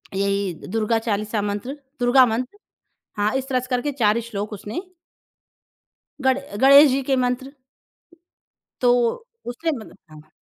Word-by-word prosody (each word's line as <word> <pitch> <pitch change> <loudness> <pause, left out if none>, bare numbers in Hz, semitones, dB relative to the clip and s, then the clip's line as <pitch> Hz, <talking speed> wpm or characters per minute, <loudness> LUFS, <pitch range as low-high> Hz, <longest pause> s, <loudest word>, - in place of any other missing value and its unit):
यही 200 -1 0 0.2
दुर्गा 225 +2 0
चालीसा 215 -1 -2
मंत्र 210 +7 -4 0.2
दुर्गा 250 +1 +5
मंत्र 250 - -3 0.6
हाँ, 210 +2 0
इस 265 0 -3
तरह 255 -1 +1
से 255 - -9
करके 250 +3 -1
4 230 -4 +2
श्लोक 205 +1 -4
उसने 210 - -5 1.4
गणे 265 -3 0
गणेश 280 +2 +8
जी 270 +2 0
के 270 0 0
मंत्र 250 +2 -3 1.3
तो 245 -1 +5 0.5
उसने 245 +7 -3
मतलब 215 - -13
हाँ। 155 0 -15
240 Hz, 130 wpm, -22 LUFS, 210-265 Hz, 1.4 s, गणेश